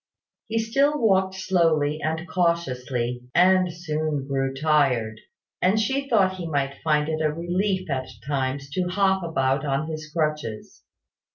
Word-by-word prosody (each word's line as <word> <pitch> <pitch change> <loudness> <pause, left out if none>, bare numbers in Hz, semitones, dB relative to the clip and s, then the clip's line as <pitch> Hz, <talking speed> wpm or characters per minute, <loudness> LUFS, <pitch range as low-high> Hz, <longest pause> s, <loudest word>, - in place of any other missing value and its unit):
He 225 0 -2
still 275 +7 +2
walked 190 -4 +2
slowly 165 -6 +1
and 160 +2 -2
cautiously, 130 -8 -1
and 185 0 +4
soon 155 -4 -2
grew 135 -1 0
tired: 135 -7 +1 0.4
and 190 +4 +3
she 270 +5 -1
thought 190 -5 +3
he 175 -2 -5
might 140 -3 -2
find 150 -1 +2
it 160 0 -2
a 155 -1 +2
relief 185 +4 -1
at 130 -3 -2 0.2
times 140 -1 -2
to 180 +3 -1
hop 190 0 +2
about 135 -5 0
on 140 +1 -1
his 155 -1 -7
crutches. 150 -9 -3
160 Hz, 145 wpm, -24 LUFS, 140-185 Hz, 0.4 s, and